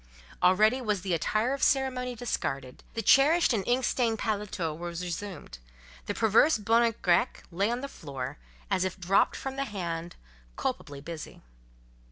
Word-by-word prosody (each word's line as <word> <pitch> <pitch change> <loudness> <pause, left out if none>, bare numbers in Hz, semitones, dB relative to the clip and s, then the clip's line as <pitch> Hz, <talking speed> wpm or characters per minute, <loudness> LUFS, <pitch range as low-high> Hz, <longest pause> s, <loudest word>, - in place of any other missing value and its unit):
Already 215 +8 +4
was 210 -6 -1
the 185 -1 -2
attire 215 - +1
of 275 - -4
ceremony 255 -2 +1
discarded: 135 - -4
the 225 - -2
cherished 285 - +5
and 205 -4 0
ink 245 +1 +2
stained 230 -3 +1
paletôt 200 -8 -2
was 170 +1 -5
resumed; 175 - -6 0.5
the - - -2
perverse 225 +8 +4
bonnet 230 +2 +2
grec 175 -2 +2
lay 195 +5 +1
on 240 +1 -2
the 280 - -4
floor, 140 - -7 0.3
as 185 -1 +2
if 185 -1 -2
just 180 -2 -10
dropped 195 +1 +4
from 270 0 -5
the 275 - -1
hand, 175 -5 -4 0.4
culpably 140 - -4
busy. 160 +1 -8
205 Hz, 160 wpm, -28 LUFS, 170-245 Hz, 0.5 s, cherished